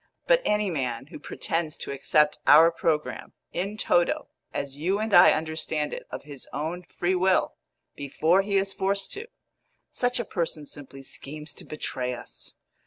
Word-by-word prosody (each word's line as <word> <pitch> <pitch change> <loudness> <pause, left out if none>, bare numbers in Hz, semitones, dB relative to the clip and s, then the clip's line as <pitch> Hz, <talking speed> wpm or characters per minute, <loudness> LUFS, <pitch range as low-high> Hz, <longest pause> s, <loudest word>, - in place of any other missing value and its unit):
But - - +5
any 210 -2 +1
man 130 -6 -2
who - - -8
pretends 165 -2 -2
to - - -5
accept 150 +2 +2
our 160 +3 +8
programme 165 -5 -1 0.2
in 200 +4 -2
toto, 175 -5 +2 0.2
as 140 0 -4
you 185 +6 +1
and 215 0 -2
I 175 - +9
understand 155 -1 -1
it, - - -7
of - - -6
his 145 -2 -9
own 165 +4 -3
free 180 +1 -2
will, 185 0 +2 0.4
before 160 +6 +2
he 200 0 0
is 195 0 0
forced 195 +1 -1
to 430 +3 -6 0.6
such 245 0 0
a 235 - -1
person 165 -5 -2
simply 135 -2 -9
schemes 150 +3 -8
to - - -14
betray 125 -4 -3
us. 120 - -10
165 Hz, 165 wpm, -26 LUFS, 150-195 Hz, 0.6 s, I